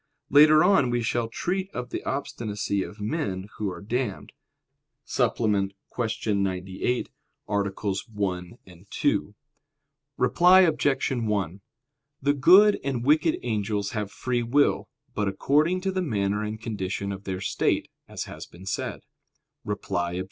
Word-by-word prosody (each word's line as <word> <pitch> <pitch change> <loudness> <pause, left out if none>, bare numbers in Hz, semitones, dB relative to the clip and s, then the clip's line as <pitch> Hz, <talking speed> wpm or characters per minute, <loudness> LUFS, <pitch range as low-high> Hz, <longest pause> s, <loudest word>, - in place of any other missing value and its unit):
Later 155 +1 +7
on 190 -11 +4
we 120 -1 0
shall 115 +1 0
treat 185 +11 -2
of 125 0 -5
the - - -4
obstinacy 105 -7 -2
of 105 - -7
men 105 - -2
who 105 -2 -1
are 90 +1 -8
damned 120 -1 -3 0.7
(Suppl., 120 - 0 0.5
Q. 110 -2 -1
98, 95 +4 -1 0.4
AA. 100 -1 0 0.4
1, 95 -2 -3 0.3
2). - - 0 0.8
Reply 180 +2 +6
Obj. 145 -7 +2
1: 105 -7 -1 0.6
The 140 +1 +2
good 190 +9 +6
and 130 -3 -2
wicked 155 +3 +3
angels 105 -3 -1
have 105 -2 -3
free 125 -1 -1
will, 135 +5 +2 0.2
but 105 -3 -1
according 150 - +2
to 190 0 -1
the 185 0 -1
manner 105 - 0
and 105 +1 -4
condition 100 -3 -3
of 100 0 -7
their 95 -1 -3
state, - - 0 0.2
as - - -5
has - - -9
been 90 +2 -14
said. 95 - -3 0.6
Reply 90 -4 -2
Obj. 90 - -3
110 Hz, 135 wpm, -26 LUFS, 100-140 Hz, 0.8 s, Later